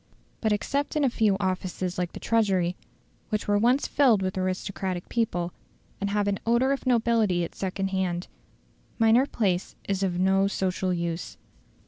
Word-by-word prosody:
But 220 - +1
except 280 +9 -1
in 300 - +2
a 265 - +3
few 215 -5 +2
offices 185 -1 -2
like 180 -1 -2
the - - -7
Treasury, 190 -6 +1 0.5
which 215 -1 -2
were 205 0 +3
once 245 +5 +3
filled 240 -9 +3
with 185 0 -2
aristocratic 185 -1 -3
people, 180 -7 -1 0.5
and 200 - -1
have 205 0 0
an 200 -1 0
odour 235 +3 +2
of 275 -1 -2
nobility 225 -7 +2
at 170 - -5
second 195 0 -2
hand, 185 -2 -1 0.7
minor 230 +4 +4
place 190 -8 -1
is 195 -1 -1
of 185 -3 0
no 190 +1 +3
social 185 -1 -1
use. 170 -1 -3
195 Hz, 160 wpm, -26 LUFS, 185-225 Hz, 0.7 s, minor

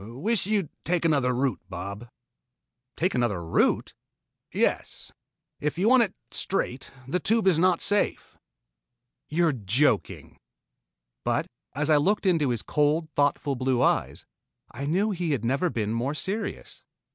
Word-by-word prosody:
"Wish 160 - -2
you'd 205 -6 0
take 170 0 0
another 140 -6 +3
route, 130 0 -1
Bob." 100 +5 -7 0.9
"Take 180 +3 +1
another 105 -9 0
route?" 80 - +1 0.6
"Yes. - - -1 0.5
If 150 +2 -2
you 190 +4 +2
want 255 +1 +6
it 220 - 0 0.2
straight, 135 -9 -2 0.2
the 180 +7 0
Tube 225 +2 +2
is 180 -4 +4
not 185 +1 +3
safe." 205 0 0 0.9
"You 170 +3 +2
are 160 - +2
joking." 120 +5 0 0.8
But - - 0 0.3
as 150 +2 0
I 150 - +6
looked 200 +9 +1
into 165 -7 +3
his 120 -3 -1
cold, 150 +2 +1
thoughtful 145 -1 +1
blue 130 -1 +1
eyes, - - 0 0.5
I 140 +3 -5
knew 195 +8 +1
he 175 -5 -1
had 120 -5 -2
never 140 +9 +1
been 110 -6 -2
more 125 +6 -1
serious. 200 +7 -4
150 Hz, 145 wpm, -26 LUFS, 125-180 Hz, 0.9 s, want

